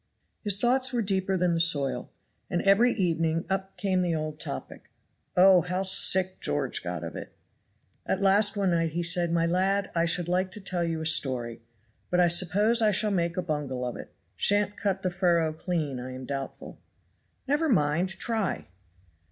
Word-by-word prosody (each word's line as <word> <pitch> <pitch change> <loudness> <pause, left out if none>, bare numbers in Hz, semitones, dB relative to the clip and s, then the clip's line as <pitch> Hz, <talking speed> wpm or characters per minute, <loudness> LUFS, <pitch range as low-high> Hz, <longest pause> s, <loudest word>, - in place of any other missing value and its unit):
His 200 -2 +2
thoughts 255 +2 +2
were 240 -2 -1
deeper 190 -1 0
than 180 -1 +1
the 165 - 0
soil. 145 -5 +1 0.4
And 175 - -1
every 205 +5 +4
evening 165 -4 -1
up 195 0 -3
came 190 -2 0
the 175 -2 0
old 155 -1 -5
topic. 65 - -6 0.5
Oh! 185 0 +7
how 180 +2 -3
sick 185 0 +3
George - - -1
got - - -5
of - - -7
it. - - -9 0.7
At 190 - 0
last 205 +2 +3
one 195 -2 +1
night 165 -2 0
he 175 +1 -2
said: 170 0 +2
"My 165 0 +1
lad, 190 +3 0
I 170 0 +1
should 170 +1 +1
like 185 +1 0
to - - -6
tell 185 -3 -3
you 165 -1 -2
a - - -5
story 130 -7 0 0.5
but 180 - +1
I 175 -1 +4
suppose 195 +7 +3
I 215 - +4
shall 210 +1 +1
make 170 -2 -1
a 185 - -1
bungle 145 -6 -3
of 125 - -4
it; - - -10 0.2
shan't 205 - +2
cut 195 -2 -2
the 185 - -1
furrow 170 -3 +1
clean 155 -5 -3
I 130 +1 -7
am 130 0 -8
doubtful." 135 0 -7 0.7
"Never 300 +3 +1
mind; 170 - +1
try!" 215 - -2
180 Hz, 185 wpm, -27 LUFS, 165-195 Hz, 0.7 s, Oh